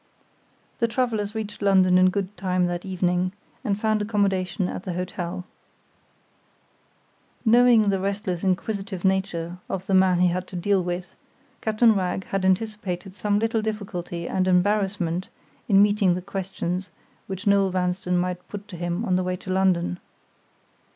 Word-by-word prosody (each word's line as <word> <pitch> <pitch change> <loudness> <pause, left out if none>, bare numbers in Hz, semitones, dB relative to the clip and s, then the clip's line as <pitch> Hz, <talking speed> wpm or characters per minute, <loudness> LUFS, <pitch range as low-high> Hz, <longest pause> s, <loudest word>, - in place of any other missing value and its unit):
The 230 - +3
travelers 225 -4 -1
reached 210 -2 -5
London 190 -2 +4
in 185 0 +6
good 195 +1 -3
time 185 0 0
that 175 0 -2
evening, 180 -1 0 0.3
and 205 -4 -1
found 215 -1 +1
accommodation 195 -3 0
at - - -5
the 185 -1 -4
hotel. 180 0 -4 2.0
Knowing 230 -2 +6
the 195 - 0
restless, 195 -2 -2
inquisitive 195 0 -2
nature 180 -2 0
of 190 -1 -3
the 195 - -1
man 185 -1 +5
he 180 - +5
had 180 +1 -2
to - - -9
deal 190 +1 +1
with, 175 0 -4 0.5
Captain 220 +1 +4
Wragge 190 -1 -1
had 195 0 -2
anticipated 190 -2 -1
some 205 +1 0
little 225 +1 +1
difficulty 180 -5 -4
and 185 0 0
embarrassment 185 -2 +1 0.4
in 200 -1 +7
meeting 205 -3 +3
the 180 - -3
questions 190 -1 -4 0.4
which 190 -1 -6
Noel 200 -1 +4
Vanstone 180 0 0
might 180 0 -2
put 205 0 -8
to 180 - -8
him 175 0 -2
on 185 - +2
the 185 - 0
way 180 0 -1
to 185 +1 -7
London. 185 -2 +1
190 Hz, 150 wpm, -24 LUFS, 180-205 Hz, 2.0 s, in